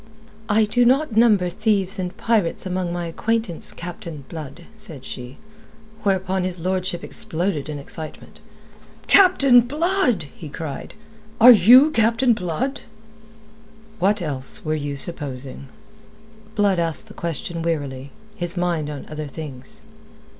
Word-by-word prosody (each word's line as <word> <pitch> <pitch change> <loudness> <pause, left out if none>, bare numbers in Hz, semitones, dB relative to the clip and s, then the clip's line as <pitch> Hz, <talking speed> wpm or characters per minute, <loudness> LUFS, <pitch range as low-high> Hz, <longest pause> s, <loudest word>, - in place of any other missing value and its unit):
"I 215 +1 +4
do 245 +4 +2
not 260 0 +2
number 215 -5 +4
thieves 200 0 -1
and 180 -1 -4
pirates 215 -8 0
among 185 -1 -2
my 175 0 -3
acquaintance, 220 +1 0
Captain 170 -4 -8
Blood," 155 0 -8
said 165 -12 -6
she; 125 +2 -8 0.6
whereupon 190 -2 0
his 180 -1 -2
lordship 185 0 -2
exploded 160 -3 -1
in 150 - -4
excitement. 155 +2 -9 0.7
"Captain 280 -11 +6
Blood!" 295 - 0
he 155 - -9
cried. 145 +3 -7 0.4
"Are 245 +2 +10
you 245 - +7
Captain 230 0 +3
Blood?" 215 - -3 1.2
"What 195 +1 +2
else 145 +6 -2
were 155 - 0
ye 145 -2 -3
supposing?" 140 -3 -6 0.9
Blood 200 -4 +2
asked 165 -2 +1
the - - -12
question 170 +1 -4
wearily, 140 -5 -3 0.3
his 175 -1 -3
mind 170 -4 -1
on 145 -2 -7
other 155 -1 -6
things. 135 -3 -5
180 Hz, 125 wpm, -22 LUFS, 155-220 Hz, 1.2 s, Are